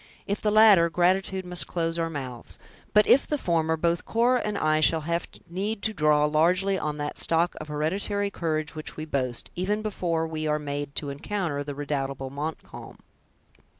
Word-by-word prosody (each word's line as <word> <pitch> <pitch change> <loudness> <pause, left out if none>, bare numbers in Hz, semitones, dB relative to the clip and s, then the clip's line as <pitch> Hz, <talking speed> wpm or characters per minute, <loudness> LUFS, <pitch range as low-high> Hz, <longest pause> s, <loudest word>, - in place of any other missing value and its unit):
If 200 - -2
the 215 - +1
latter, 210 -5 +6
gratitude 185 +2 +1
must 180 0 -2
close 165 -1 -2
our 165 0 0
mouths; 130 -6 -7 0.3
but 210 0 +5
if 275 - +5
the 300 - 0
former, 160 - +1
both 170 +1 0
Cora 240 +2 +2
and 210 -1 -2
I 155 -2 +2
shall 160 +1 +3
have 170 +2 -2 0.2
need 200 +5 -3
to 220 - 0
draw 150 -4 +3
largely 180 +6 +3
on 150 -1 -3
that 145 0 -4
stock 165 +1 +2
of 155 - -7
hereditary 195 +7 -1
courage 155 -4 -2
which 155 -1 -7
we 155 - -4
boast, 130 -5 -3
even 205 +4 -1
before 170 -6 -1
we 155 -1 -3
are 150 0 +2
made 145 -1 -5
to 145 -2 -2
encounter 150 -1 -3
the 145 0 -6
redoubtable 135 -2 -3
Montcalm." 150 +3 -7
165 Hz, 180 wpm, -26 LUFS, 150-190 Hz, 0.3 s, latter